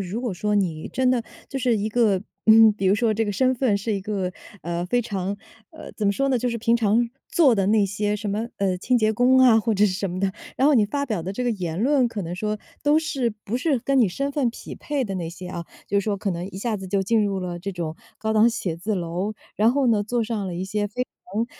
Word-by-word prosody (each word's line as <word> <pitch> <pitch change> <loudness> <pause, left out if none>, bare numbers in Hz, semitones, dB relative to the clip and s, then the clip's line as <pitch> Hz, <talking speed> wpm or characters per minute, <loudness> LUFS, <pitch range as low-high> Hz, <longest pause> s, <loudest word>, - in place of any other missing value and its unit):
如 215 +6 -3
果 235 -6 -2
说， 210 +3 -1
你 170 -6 -1
真 255 -1 +1
的 245 -2 +1 0.2
就 270 - -4
是 245 -3 +2
一 210 +1 -2
个 210 -5 +2 0.2
嗯， 220 0 +8
比 195 -2 -2
如 190 - +5
说 220 0 +2
这 225 +1 0
个 - - -1
身 260 +4 +2
份 235 -5 +1
是 215 +2 -2
一 195 - -2
个， 190 -2 -3 0.3
呃， 170 +1 -3
非 245 +6 +1
常 200 -2 -3 0.3
呃， 315 - -11
怎 210 - -2
么 200 - +3
说 275 +4 0
呢， 255 - +2
就 245 - -1
是 235 - -2
平 230 +1 +2
常 230 +1 +2 0.2
做 335 -11 +4
的 195 -2 +1
那 210 -1 +4
些 205 +2 -1
什 210 0 -5
么， 220 +4 -2
呃， 190 -2 0
清 250 +6 +1
洁 220 -1 +2
工 250 +3 +4
啊， 230 -4 +6
或 225 -1 0
者 205 +2 +4
是 195 - +2
什 195 0 -2
么 180 - -4
的， 190 0 0 0.2
然 270 - +3
后 300 - +5
你 220 -6 +4
发 280 +6 -2
表 215 -10 -2
的 190 +3 -5
这 250 - -2
个 245 - +2
言 180 -6 -3
论， 265 -2 +3
可 210 -4 -5
能 170 +1 -5
说 210 +2 -2 0.2
都 295 +2 +4
是， 285 -6 -1 0.2
不 235 +5 -2
是 285 -2 +1
跟 270 +3 +2
你 220 - +4
身 275 +9 -3
份 275 -5 +1
匹 235 - -8
配 285 -3 -2
的 195 - -4
那 170 -2 -3
些 180 +2 -8
啊。 170 -2 -6 0.2
就 200 +1 +1
是 - - -7
说 205 -2 0
可 195 0 -2
能 175 +1 -4
一 190 - -10
下 215 +1 -2
子 190 - -7
就 195 0 +1
进 220 +2 +2
入 195 -1 -2
了 175 -1 -4
这 195 +3 -4
种 165 -3 -4 0.2
高 220 0 -2
档 220 +2 +5
写 180 -7 -2
字 210 +6 -2
楼， 180 +4 -3 0.2
然 220 +3 +4
后 275 0 +1
呢， 220 -4 +3
做 230 +2 -1
上 215 -3 -3
了 175 - -4
一 180 - -3
些 205 +2 -1
非 250 +5 -3 0.3
常， 225 +3 0
215 Hz, 295 characters per minute, -24 LUFS, 195-240 Hz, 0.3 s, 嗯